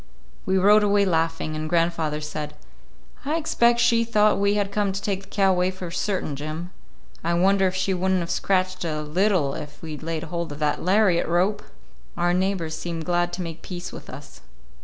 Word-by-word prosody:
We 190 0 +2
rode 205 +3 +6
away 205 -1 +3
laughing, 165 -3 0
and 155 0 -4
grandfather 165 -3 0
said: 150 0 -5 0.7
"I 295 +3 -1
expect 240 -7 +2
she 235 -1 +4
thought 215 -3 +3
we 200 +1 +2
had 200 -1 0
come 205 -1 0
to 195 - -3
take 200 -1 -2
the 195 - -17
cow 195 -2 +3
away 180 0 +2
for 185 -2 -7
certain, 185 -5 -2
Jim. 155 +5 -6 0.5
I 170 +1 +1
wonder 190 +2 +3
if 185 - -3
she 190 +1 0
would 185 +1 0
n't 185 - +2
have 170 - -4
scratched 185 -1 0
a 155 -2 -2
little 170 -2 +1
if 150 -2 -8
we'd 155 -2 -6
laid 160 0 -3
hold 170 -2 -4
of 145 - -7
that 150 -1 0
lariat 185 -1 +3
rope!" 185 +5 +1 0.6
Our 175 0 +2
neighbors 180 -3 -1
seemed 165 -1 -5
glad 175 0 +1
to 180 - -3
make 165 -1 -7
peace 180 -1 -6
with - - -10
us. - - -11
180 Hz, 200 wpm, -24 LUFS, 165-195 Hz, 0.7 s, rode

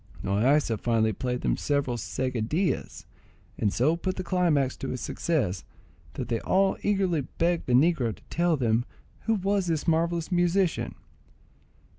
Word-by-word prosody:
Loaysa 115 +4 +2
finally 110 -2 +1
played 125 +4 -3
them - - +1
several 140 -4 0
seguidillas, 130 - -2 0.5
and 105 - +1
so 145 +10 +2
put 185 +2 -3
the 185 - -4
climax 170 -7 +1
to 135 - -5
his 130 - -3
success, 120 - -1 0.5
that - - -4
they 115 - -1
all 195 - +2
eagerly 190 -6 +1
begged 170 +5 -1
the 125 - +1
negro 130 -5 +3
to - - -22
tell 170 -1 +2
them 115 -2 +1 0.4
who 225 - +2
was 195 -1 0
this 160 -3 -1
marvellous 165 +1 +1
musician. 175 0 +1
155 Hz, 145 wpm, -27 LUFS, 125-175 Hz, 0.5 s, negro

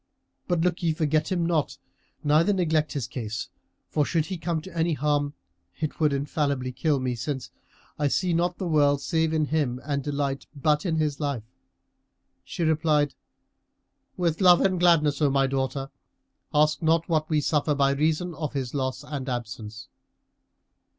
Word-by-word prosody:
But 175 -3 +1
look 175 0 0
ye 165 -2 +1
forget 155 +1 0
him 175 -2 +1
not 165 -4 0 0.5
neither 155 +7 +4
neglect 160 -5 +1
his 140 -5 -2
case; 115 -2 -5 0.4
for 150 - +1
should 160 +1 0
he 190 0 -4
come 165 0 -1
to 180 +1 -11
any 165 0 +1
harm, 145 0 0 0.4
it 155 -2 -3
would 155 -2 +3
infallibly 140 -2 -1
kill 140 +3 0
me, 130 -1 -1
since 130 +3 -4 0.5
I 145 - +2
see 175 +5 +1
not 175 +1 +1
the 190 - -3
world 145 -4 +3
save 160 -1 +1
in 155 -1 +1
him 145 -5 -1
and 140 -1 -1
delight 140 -1 -2
but 150 +4 +1
in 165 - 0
his 150 -3 0
life." 140 -7 -2 1.0
She 170 - -4
replied, 155 -2 +2 1.0
"With 170 0 0
love 180 -2 +7
and 185 -2 +2
gladness, 160 -4 +4
O 145 - +4
my 135 0 +3
daughter. 135 0 -2 0.6
Ask 150 0 +3
not 165 +1 +2
what 155 -2 0
we 155 -2 +2
suffer 150 0 +1
by 140 -1 +3
reason 155 +5 0
of 155 -1 -4
his 130 -3 -3
loss 130 -2 -2
and 140 -3 -5
absence." 115 -3 -5
150 Hz, 165 wpm, -26 LUFS, 140-160 Hz, 1.0 s, love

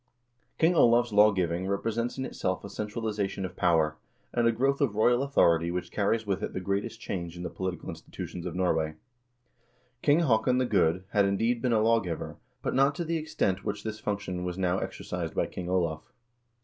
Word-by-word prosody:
King 165 +2 +4
Olav's 120 -6 +4
lawgiving 95 -4 +3
represents 115 +5 -1
in 130 - -2
itself 95 -7 -2
a 100 - -8
centralization 105 -2 -3
of 90 -1 -7
power, 80 -4 +2 0.4
and 120 -1 +3
a - - +5
growth 135 +5 +1
of 125 -8 +1
royal 120 +3 +4
authority 85 - +3
which 90 +1 -3
carries 110 +2 0
with 100 -1 -1
it - - -4
the - - -2
greatest 100 +2 -2
change 85 -2 -5
in 90 - -6
the - - -4
political 95 -2 -4
institutions 85 -1 -7
of - - -5
Norway. 80 -4 0 1.1
King 150 +3 +4
Haakon 125 -3 +3
the 130 - +2
Good 90 -5 +2
had, 100 -3 +4
indeed, 115 +5 +1
been 125 - +1
a 110 -2 +3
lawgiver, 110 -7 0 0.3
but - - -1
not 135 +2 +3
to 175 - -2
the 165 +1 0
extent 100 - -1
which 100 0 -3
this 110 0 -5
func 105 -1 -2
tion 90 -3 -4
was 90 0 -3
now 95 0 +1
exercised - - -5
by - - +2
King 90 -1 -6
Olav. 85 -4 0
100 Hz, 190 wpm, -28 LUFS, 90-115 Hz, 1.1 s, a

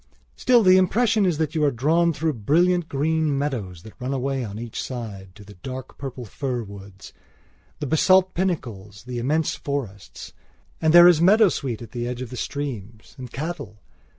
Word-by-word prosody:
Still, 245 -3 +4
the 185 -1 +6
impression 210 +2 +2
is 170 -4 0
that 160 -1 -1
you 155 -2 0
are 145 - +4
drawn 160 +7 +2
through 160 0 -1
brilliant 165 - +1
green 155 +1 0
meadows 110 - -4
that 110 - -12
run 130 +2 -3
away 135 0 -2
on 105 -2 -7
each 115 0 -6
side 100 -7 -7
to 105 - -13
the 105 - -13
dark 130 +7 -9
purple 130 -3 -6
fir 125 +2 -4
woods; 100 -1 -12 0.7
the - - -3
basalt 185 +5 +3
pinnacles; 115 - -4
the 125 -1 -5
immense 150 +6 0
forests. 120 -9 -6 0.5
And 160 - +3
there 175 +1 +9
is 170 -3 +5
meadowsweet 175 - +3
at 115 - -12
the 120 -1 -4
edge 125 +1 -4
of 125 - -10
the - - -6
streams, 120 -6 -6
and 125 -2 -8
cattle. 145 - -6
135 Hz, 180 wpm, -23 LUFS, 115-160 Hz, 0.7 s, there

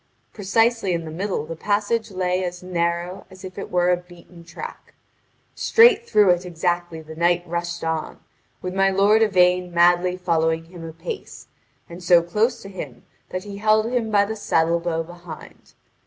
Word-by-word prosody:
Precisely 225 0 +1
in 165 -1 -3
the 155 - -7
middle 185 -2 -3
the 165 +1 -6
passage 210 +5 -1
lay 185 -1 -1
as 180 0 -5
narrow 175 +1 -2
as 190 0 -14
if 185 +1 -8
it - - -6
were 180 0 +2
a 180 - +3
beaten 175 -1 -15
track. 170 - -10 0.6
Straight 465 0 +4
through 205 -3 +5
it 175 0 +1
exactly 175 -1 -2
the 160 0 -10
knight 175 +1 +2
rushed 170 0 -4
on, 160 -1 -3 0.4
with 180 0 -4
my 195 0 +3
lord 200 +3 +4
Yvain 180 -3 +3
madly 175 +1 +3
following 165 -2 0
him 170 0 -11
apace, 165 - -8 0.4
and 175 +1 -10
so 170 -1 +5
close 215 +8 0
to - - -9
him 150 -11 -8 0.3
that 185 0 -4
he 200 -1 -8
held 215 +2 +2
him 240 -3 0
by 205 -1 +3
the 220 +2 -4
saddle 170 -5 +1
bow 165 -1 -2
behind. 175 -1 -12
180 Hz, 170 wpm, -22 LUFS, 170-200 Hz, 0.6 s, through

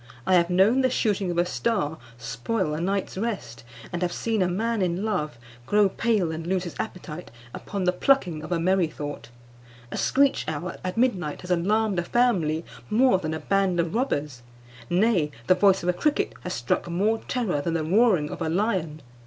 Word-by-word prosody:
I 185 - +2
have 170 -1 +4
known 195 +9 +4
the 260 - +3
shooting 205 -6 0
of 175 - -2
a 175 - +3
star 180 -5 -1 0.2
spoil 150 - -2
a 155 - -3
night's 195 +1 -2
rest, 125 - -4 0.3
and 175 - -2
have 180 -1 0
seen 220 +3 -1
a 185 - +3
man 220 +4 -1
in 180 +2 0
love 150 - -2 0.3
grow 205 -1 +4
pale 210 -5 0
and 160 +1 -5
lose 185 0 0
his 175 - -6
appetite 180 -5 -6 0.2
upon 200 -1 -4
the 180 - +3
plucking 180 - +2
of 155 - -8
a 175 - +2
merrythought. 155 -8 -1 0.6
A - - -4
screech 275 +1 +2
owl 160 +3 -4
at 185 +3 -4
midnight 190 - 0
has 180 - -6
alarmed 200 +3 +1
a - - -1
family 170 -9 +1 0.2
more 225 -2 +4
than 160 -2 -3
a - - -4
band 195 0 +1
of 170 +1 0
robbers; 150 - -1 0.5
nay, 180 -4 +2 0.2
the - - +5
voice 190 0 +3
of 180 - 0
a - - +3
cricket 295 +11 0
has 180 - -4
struck 120 +7 -1
more 205 +6 +1
terror 215 - -1
than 165 +3 -2
the 160 - 0
roaring 185 -3 +3
of - - -7
a 160 - 0
lion. 170 -5 -1
180 Hz, 195 wpm, -25 LUFS, 160-215 Hz, 0.6 s, the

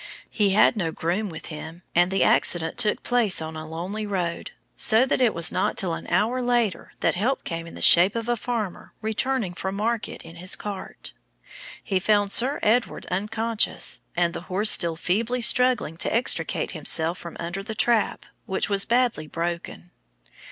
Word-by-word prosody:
He 205 -3 +2
had 200 +4 +4
no 170 -6 -2
groom 180 +7 -2
with 160 -2 -9
him, 160 +3 -9
and 175 +1 +3
the 195 +1 +1
accident 165 -2 +1
took 210 - +2
place 240 -6 +3
on 160 0 -5
a 155 0 -7
lonely 185 +7 -5
road, 180 - -3 0.3
so 225 +3 +4
that 260 - 0
it 240 -3 +4
was 170 -3 +2
not 185 - -1
till 180 -3 -1
an - - -7
hour 245 +4 +1
later 240 -7 -1
that - - +2
help 235 +9 -1
came, 165 0 -5
in - - -11
the - - -6
shape 180 +5 +7
of 230 0 -3
a 240 - +1
farmer 225 -5 -5
returning 220 -2 -1
from 190 +2 -4
market 220 +1 -3
in 165 - -12
his 185 +2 -1
cart. 200 -2 -7 0.7
He 190 -2 0
found 205 0 +2
Sir 260 +7 +3
Edward 230 +3 +1
unconscious, 215 +4 -1 0.2
and 170 -1 +1
the - - -6
horse 205 +4 +3
still 170 -2 +2
feebly 220 +9 -1
struggling 250 -10 +3
to - - -1
extricate 230 +3 0
himself 165 +1 +2
from 170 - -9
under 170 +3 -4
the 220 +2 -7
trap, 225 +3 0 0.2
which 190 - 0
was 200 -1 +3
badly 240 -10 +1
broken. 170 +2 -5
195 Hz, 180 wpm, -24 LUFS, 170-225 Hz, 0.7 s, shape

